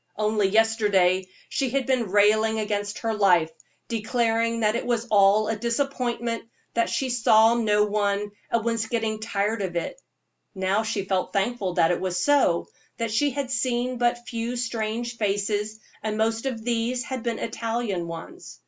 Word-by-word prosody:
Only 215 -1 +2
yesterday 200 -4 +3 0.2
she 270 -2 -1
had 265 +1 0
been 255 -6 0
railing 215 +2 +3
against 205 -1 -2
her 225 -1 -2
life, 180 -6 +3 0.4
declaring 230 0 0
that 215 0 +2
it 235 - -1
was 235 -1 0
all 205 +1 +5
a 225 - 0
disappointment, 235 0 -2 0.3
that 230 - +1
she 265 -2 -1
saw 225 -1 +5
no 210 -3 +2
one, 205 0 -1 0.2
and 230 -1 0
was 230 -1 0
getting 220 -2 -1
tired 215 0 -1
of 185 -3 -3
it; - - -3 0.5
now 190 +2 +1
she 215 -3 -2
felt 190 -1 -1
thankful 200 -2 -1
that 165 - +4
it 175 - -1
was 185 -1 -1
so, 230 -6 +3 0.3
that 230 -2 -2
she 285 +7 +2
had 275 -1 -4
seen 250 0 -1
but 240 0 0
few 235 +1 -3
strange 235 0 -3
faces, 210 +1 -1 0.2
and 215 0 -2
most 225 +3 0
of 230 -4 -4
these 240 +1 -1
had 260 -2 -5
been 235 -1 -2
Italian 225 -6 -3
ones. 170 - -9
225 Hz, 165 wpm, -25 LUFS, 205-235 Hz, 0.5 s, all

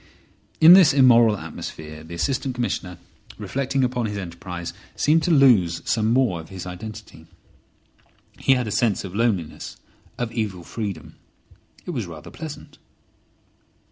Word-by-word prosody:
In 165 +2 +9
this 185 -7 +7
immoral 120 -5 +6
atmosphere 75 -4 -8
the 85 +2 -9
Assistant 130 +7 -2
Commissioner, 90 -7 -3 0.4
reflecting 135 0 -2
upon 125 -2 -1
his 105 -1 -5
enterprise, 85 -2 -6 0.2
seemed 160 +2 +3
to 180 - -1
lose 115 - +4
some 110 -1 +1
more 120 -8 +2
of 80 - -11
his 95 -2 -8
identity. 95 +4 -9 1.1
He 135 - +4
had 125 -2 0
a - - -3
sense 110 -2 +1
of 95 -2 -8
loneliness, 100 -7 -2 0.4
of 120 -2 -3
evil 105 -6 -3
freedom. 100 -4 -6 0.7
It - - -4
was 120 - -3
rather 80 -3 -10
pleasant. 155 -2 -9
110 Hz, 140 wpm, -23 LUFS, 90-130 Hz, 1.1 s, In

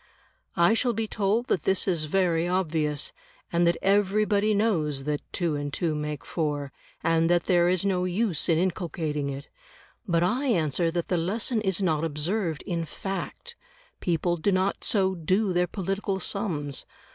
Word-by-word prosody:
I 170 +5 +5
shall 240 +1 +1
be 225 0 -1
told 210 +3 0
that 190 - 0
this 190 +1 +1
is 170 -5 +1
very 170 0 +1
obvious, 160 -5 0 0.4
and 170 0 +3
that 170 - +2
everybody 205 +1 +3
knows 160 -10 +1
that 150 0 -2
2 170 -4 0
and 145 0 -3
2 165 +1 -1
make 150 -4 -4
4, 145 -4 -2 0.3
and 165 0 +3
that 175 -1 +3
there 175 -1 +4
is 185 +1 +1
no 185 -2 +1
use 185 -3 0
in 165 - +4
inculcating 165 -5 -1
it. 140 +1 -6 0.6
But 170 -2 +2
I 245 +10 +1
answer 165 - +1
that 170 0 -3
the 180 - +2
lesson 215 +7 0
is 190 -1 0
not 160 -4 +1
observed 165 +2 -1
in 170 -4 -2
fact; 195 - -6 0.4
people 175 0 0
do 200 +5 +1
not 190 +1 0
so 190 -3 +2
do 185 +4 +1
their 180 0 +2
political 195 +1 -2
sums. 150 -9 -2
175 Hz, 165 wpm, -26 LUFS, 160-195 Hz, 0.6 s, I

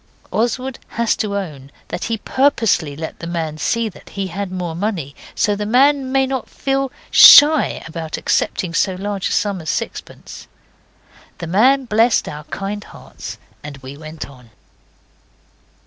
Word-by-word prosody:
Oswald 250 +3 -1 0.2
has 235 -1 +2
to 200 -2 -2
own 150 -9 -6 0.2
that - - -4
he 225 -1 -1
purposely 220 - +1
let 160 +2 -7
the 170 - -6
man 160 -3 -3
see 230 +7 0
that 205 - -12
he 195 -1 -4
had 195 +1 -5
more 180 -3 -4
money, 170 -7 -3 0.2
so 210 - +1
that 205 - -1
the 210 - -4
man 270 +1 +3
might 270 0 +2
not 265 -3 -3
feel 270 -1 -1 0.2
shy 300 +1 +8
about 160 -1 -5
accepting 175 -3 -1
so 190 +2 +1
large 200 0 -3
a - - -5
sum 200 -4 0
as 155 - -6
sixpence. - - -6 0.9
The - - -6
man 255 +10 +3
blessed 225 +1 +2
our 150 0 -7
kind 200 +5 -5
hearts - - -10 0.3
and 150 -1 -8
we 135 0 -10
went 155 +1 -8
on. 125 -4 -16
200 Hz, 160 wpm, -19 LUFS, 160-235 Hz, 0.9 s, shy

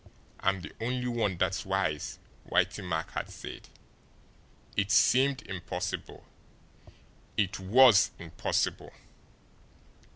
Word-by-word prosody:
"I'm 95 -1 +1
the 80 - -9
only 125 +2 -1
one 115 -7 0
that's 95 +1 0
wise," 95 -6 -1 0.3
Whitey - - +1
Mack 80 -2 -3
had - - -4
said. - - -9 1.1
It 100 0 +1
seemed 130 +2 +4
impossible. 90 -3 -5 1.1
It 100 -1 0
WAS 100 0 +6
impossible! 85 -1 -2
95 Hz, 95 wpm, -29 LUFS, 90-120 Hz, 1.1 s, WAS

